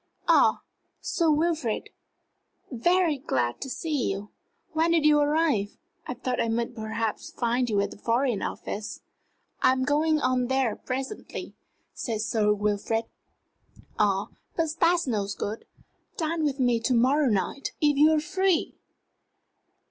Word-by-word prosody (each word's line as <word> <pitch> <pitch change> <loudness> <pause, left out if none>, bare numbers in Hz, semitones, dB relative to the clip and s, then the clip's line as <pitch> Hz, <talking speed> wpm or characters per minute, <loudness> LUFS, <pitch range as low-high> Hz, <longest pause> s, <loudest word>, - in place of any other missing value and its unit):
Ah, - - +4 0.4
Sir 335 -2 0
Wilfrid! 310 -6 0 0.8
very 330 +4 +2
glad 120 - -1
to 270 - -4
see 290 0 -1
you! 200 +2 -5 0.4
When 320 +1 +2
did 330 -2 +3
you 300 -1 +6
arrive? 290 -8 +1 0.3
I 250 - -3
thought 250 0 -2
I - - 0
might 235 +1 -1
perhaps 220 -1 -3
find 240 +1 0
you 205 -2 +1
at 200 0 -2
the - - -12
Foreign 235 -1 +1
Office." 215 +2 -5 0.6
"I'm 260 0 +3
going 305 +3 +2
on 255 -2 +1
there 265 -3 +1
presently," 265 +9 -5 0.4
said 225 -3 -3
Sir 215 -1 +1
Wilfrid. 210 +2 0 0.9
"Ah, 205 0 +2 0.3
but 325 -2 0
that's 345 +1 +3
no 215 -6 -1
good. 215 +2 -4 0.5
Dine 320 -1 -1
with 280 -1 -1
me 245 -2 +3
to 245 +2 +1
morrow 270 +5 +3
night? 210 +6 -1
if 295 -1 +3
you 300 +3 +6
are 310 - +3
free? 370 +2 +1
255 Hz, 140 wpm, -27 LUFS, 225-305 Hz, 0.9 s, you